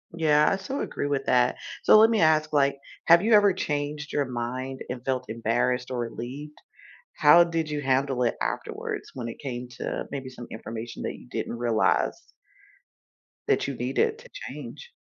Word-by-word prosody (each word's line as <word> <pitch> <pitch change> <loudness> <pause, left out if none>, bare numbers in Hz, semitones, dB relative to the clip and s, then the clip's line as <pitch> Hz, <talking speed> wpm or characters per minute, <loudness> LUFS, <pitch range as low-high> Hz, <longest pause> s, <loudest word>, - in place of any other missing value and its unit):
Yeah, 150 -2 +4
I - - +1
so 195 +9 -5
agree 145 - -3
with 140 -1 -1
that, 125 0 +3 0.3
so, - - +7
let 220 +1 +7
me 225 -5 +2
ask, 155 -1 +3
like, 140 -1 +2 0.3
have 170 +1 +7
you 225 +2 +2
ever 205 -1 +7
changed 150 -3 -3
your 145 - +2
mind 130 +2 -4
and 125 -1 -5
felt 130 -1 -2
embarrassed 120 +3 0
or 125 - -2
relieved? 130 +6 -6 0.6
How 155 +3 +7
did 165 -2 -2
you 150 -1 -2
handle 135 -1 +1
it 115 - 0
afterwards - - -4
when 120 -3 -5
it 115 - -8
came 125 -3 -5
to, - - -3
uh, - - -5
maybe 135 -2 -5
some 125 -2 -10
information 115 +1 -7
that - - -3
you - - -13
didn't 120 - -3
realize 115 -2 0 1.2
that - - +2
you 140 - -3
needed 130 - 0
to - - -15
change? 485 -1 -9
135 Hz, 180 wpm, -26 LUFS, 125-155 Hz, 1.2 s, so